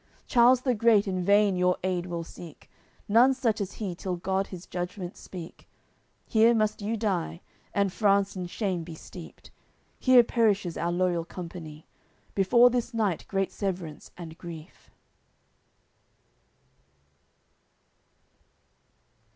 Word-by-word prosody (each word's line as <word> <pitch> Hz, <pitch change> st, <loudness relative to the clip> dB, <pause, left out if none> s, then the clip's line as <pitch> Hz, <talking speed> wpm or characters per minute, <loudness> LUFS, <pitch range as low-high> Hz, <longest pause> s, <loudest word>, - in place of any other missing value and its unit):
Charles 245 Hz, +1 st, +5 dB
the 255 Hz, -1 st, +1 dB
great 215 Hz, -2 st, +3 dB
in 185 Hz, -2 st, -1 dB
vain 200 Hz, +1 st, +4 dB
your 180 Hz, 0 st, +2 dB
aid 180 Hz, -1 st, -1 dB
will 170 Hz, -1 st, -4 dB
seek 165 Hz, -1 st, -13 dB, 0.4 s
None 245 Hz, +6 st, +5 dB
such 230 Hz, -5 st, 0 dB
as 200 Hz, 0 st, -4 dB
he 200 Hz, -5 st, -4 dB
till 180 Hz, +1 st, -4 dB
God 190 Hz, +2 st, -1 dB
His 180 Hz, -2 st, -9 dB
Judgement 180 Hz, 0 st, -5 dB
speak; 175 Hz, -3 st, -10 dB, 0.6 s
Here 225 Hz, +1 st, +4 dB
must 215 Hz, -1 st, 0 dB
you 220 Hz, +3 st, -2 dB
die, 185 Hz, -5 st, -2 dB, 0.3 s
and 200 Hz, -2 st, 0 dB
France 200 Hz, -1 st, +2 dB
in 180 Hz, -1 st, -4 dB
shame 185 Hz, -2 st, -2 dB
be 165 Hz, 0 st, -9 dB
steeped; 170 Hz, +1 st, -12 dB, 0.5 s
Here 255 Hz, -2 st, +6 dB
perishes 205 Hz, -7 st, +1 dB
our 170 Hz, +1 st, -1 dB
loyal 175 Hz, -1 st, 0 dB
company, 165 Hz, -3 st, -9 dB, 0.5 s
Before 235 Hz, +6 st, +5 dB
this 240 Hz, 0 st, -2 dB
night 205 Hz, -7 st, 0 dB
great 195 Hz, -1 st, -1 dB
severance 180 Hz, -6 st, -5 dB
and 165 Hz, -2 st, -8 dB
grief." 165 Hz, -3 st, -11 dB
190 Hz, 125 wpm, -27 LUFS, 175-215 Hz, 0.6 s, Here